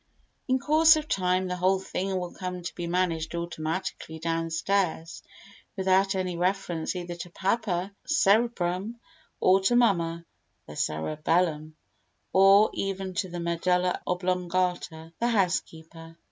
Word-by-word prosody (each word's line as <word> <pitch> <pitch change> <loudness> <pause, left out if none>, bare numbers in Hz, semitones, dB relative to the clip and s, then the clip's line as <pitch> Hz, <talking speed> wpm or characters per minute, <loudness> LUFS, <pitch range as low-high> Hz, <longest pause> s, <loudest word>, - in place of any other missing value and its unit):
In 260 0 +2
course 310 +4 +5
of 310 -1 -3
time 185 -3 +1
the 180 0 -3
whole 185 +2 +2
thing 190 0 -3
will 180 -1 -5
come 180 -1 -6
to 170 - -5
be 175 - -5
managed 170 -2 -1
automatically 170 0 -4
downstairs 165 +1 -1 0.6
without 190 +1 +2
any 185 -2 -2
reference 180 -2 -1
either 175 -1 -5
to 175 +1 -8
papa, 190 0 -1
the - - -19
cerebrum, 215 - +1 0.4
or 185 +1 +5
to 215 +6 +2
mamma, 170 -8 +2 0.4
the 75 - -10
cerebellum, 155 - -1 0.6
or 195 +2 +6
even 195 -1 -3
to 185 +1 -2
the 175 0 -6
medulla 180 +1 0
oblongata, 180 -2 -2
the 235 - +1
housekeeper. 165 -6 -2
180 Hz, 130 wpm, -27 LUFS, 170-195 Hz, 0.6 s, or